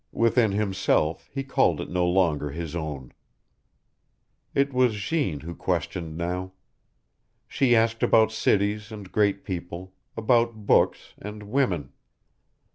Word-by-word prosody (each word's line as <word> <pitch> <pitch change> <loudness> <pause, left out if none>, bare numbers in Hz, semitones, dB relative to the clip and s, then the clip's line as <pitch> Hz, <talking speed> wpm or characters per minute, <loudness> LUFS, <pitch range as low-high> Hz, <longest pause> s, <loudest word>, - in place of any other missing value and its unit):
Within 115 -1 +2
himself 95 -6 0
he 135 0 -3
called 135 - +2
it - - -4
no 90 -1 0
longer 85 -5 +1
his 80 +2 -6
own. 75 -6 -5 1.4
It 140 0 +2
was 125 -3 +3
Jeanne 105 - -1
who 85 +2 -7
questioned 80 0 -3
now. 90 +2 -3 0.9
She 125 -3 +2
asked 115 0 +2
about 110 -1 +4
cities 105 0 0
and 105 -4 -9
great 100 -2 +1
people, 90 0 -6 0.2
about 115 -1 +1
books - - +2
and 105 +1 -8
WOMEN. 100 - -1
100 Hz, 120 wpm, -25 LUFS, 85-115 Hz, 1.4 s, about